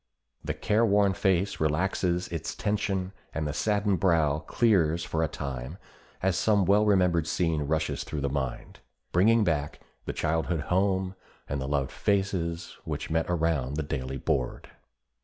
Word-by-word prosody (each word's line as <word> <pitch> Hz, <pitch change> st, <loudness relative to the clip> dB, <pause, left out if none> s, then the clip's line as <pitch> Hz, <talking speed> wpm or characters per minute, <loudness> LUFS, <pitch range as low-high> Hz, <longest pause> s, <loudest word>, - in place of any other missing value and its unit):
The -, -, -3 dB
care 110 Hz, +2 st, +2 dB
worn 100 Hz, -3 st, +4 dB
face 95 Hz, 0 st, +1 dB
relaxes 90 Hz, +3 st, 0 dB
its 80 Hz, -2 st, -4 dB
tension 100 Hz, -3 st, -1 dB, 0.2 s
and 80 Hz, -1 st, -1 dB
the 75 Hz, -, -2 dB
saddened 100 Hz, +1 st, +1 dB
brow 80 Hz, -5 st, +3 dB
clears 85 Hz, -5 st, +2 dB
for 80 Hz, -, -2 dB
a -, -, +2 dB
time 70 Hz, +2 st, -5 dB, 0.5 s
as 95 Hz, -1 st, +2 dB
some 100 Hz, -1 st, +3 dB
well 105 Hz, +3 st, +4 dB
remembered 90 Hz, -5 st, +3 dB
scene 80 Hz, -2 st, 0 dB
rushes 80 Hz, +1 st, -1 dB
through 75 Hz, -2 st, -4 dB
the 70 Hz, -, 0 dB
mind, 65 Hz, -2 st, -4 dB, 0.3 s
bringing 110 Hz, +6 st, +4 dB
back 75 Hz, -6 st, -1 dB, 0.3 s
the -, -, -3 dB
childhood 80 Hz, +1 st, 0 dB
home 95 Hz, 0 st, +1 dB, 0.3 s
and 70 Hz, 0 st, -3 dB
the 65 Hz, -, -3 dB
loved 70 Hz, -2 st, 0 dB
faces 90 Hz, -4 st, -1 dB
which -, -, -4 dB
met 80 Hz, 0 st, +1 dB
around 80 Hz, -6 st, 0 dB
the 80 Hz, -, -1 dB
daily 65 Hz, -2 st, -4 dB
board. 65 Hz, -2 st, -2 dB
85 Hz, 155 wpm, -28 LUFS, 75-95 Hz, 0.5 s, worn